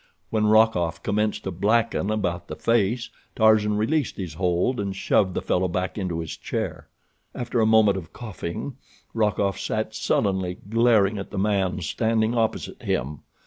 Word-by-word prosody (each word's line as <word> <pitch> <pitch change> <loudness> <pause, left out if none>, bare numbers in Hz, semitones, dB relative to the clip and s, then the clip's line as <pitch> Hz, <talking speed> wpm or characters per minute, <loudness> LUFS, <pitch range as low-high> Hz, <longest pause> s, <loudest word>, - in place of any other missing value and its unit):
When 110 -1 +2
Rokoff 110 -6 +3
commenced 105 +1 0
to 95 - -3
blacken 105 +3 +1
about 90 -5 -2
the - - -6
face 115 +1 +1 0.2
Tarzan 110 -1 +4
released 140 +6 0
his 90 -5 -5
hold 90 +8 0
and 100 -1 -2
shoved 95 -1 +1
the - - -2
fellow 90 +1 +1
back 90 +1 -2
into 90 -5 -2
his 80 - -6
chair. - - -4 0.5
After 120 -1 -1
a 110 - +3
moment 110 -3 +5
of 80 -2 -12
coughing 110 +3 -6 0.4
Rokoff 100 -3 0
sat 110 +2 -2
sullenly 95 -4 0
glaring 110 -2 +3
at 100 - -6
the - - -7
man 95 -2 0
standing 110 +6 0
opposite 115 -2 -1
him. 75 +3 -2
105 Hz, 155 wpm, -24 LUFS, 95-110 Hz, 0.5 s, moment